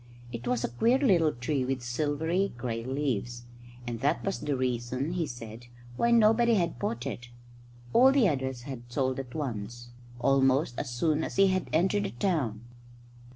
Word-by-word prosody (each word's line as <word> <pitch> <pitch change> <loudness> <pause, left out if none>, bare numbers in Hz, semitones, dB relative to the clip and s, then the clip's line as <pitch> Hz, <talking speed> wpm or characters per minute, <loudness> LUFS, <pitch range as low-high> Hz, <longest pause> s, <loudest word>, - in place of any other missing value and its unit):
It 120 0 -6
was 120 -1 0
a - - 0
queer 230 - +2
little 185 - +3
tree 130 +2 -2
with 130 -1 -2
silvery 155 +9 -1
grey 115 -2 -3
leaves; 120 -3 -2 0.4
and 120 -1 -4
that 145 +6 0
was 195 - -1
the 145 -2 -2
reason, 125 +3 -2
he 170 -3 -1
said, 120 -1 -9 0.3
why 235 - +1
nobody 230 0 +5
had 170 - 0
bought 120 0 -3
it. 120 0 -6 0.6
All 260 +2 +7
the 270 -6 +4
others 130 -5 -2
he 140 - -7
had 120 -2 -9
sold 130 0 0
at 130 0 -7
once 120 -4 -5 0.3
almost 135 0 +2
as 140 - -3
soon 150 +6 0
as - - -5
he 195 0 +5
had 185 -1 -1
entered 190 +5 +2
the - - -2
town. 120 - -1
135 Hz, 175 wpm, -29 LUFS, 120-170 Hz, 0.6 s, All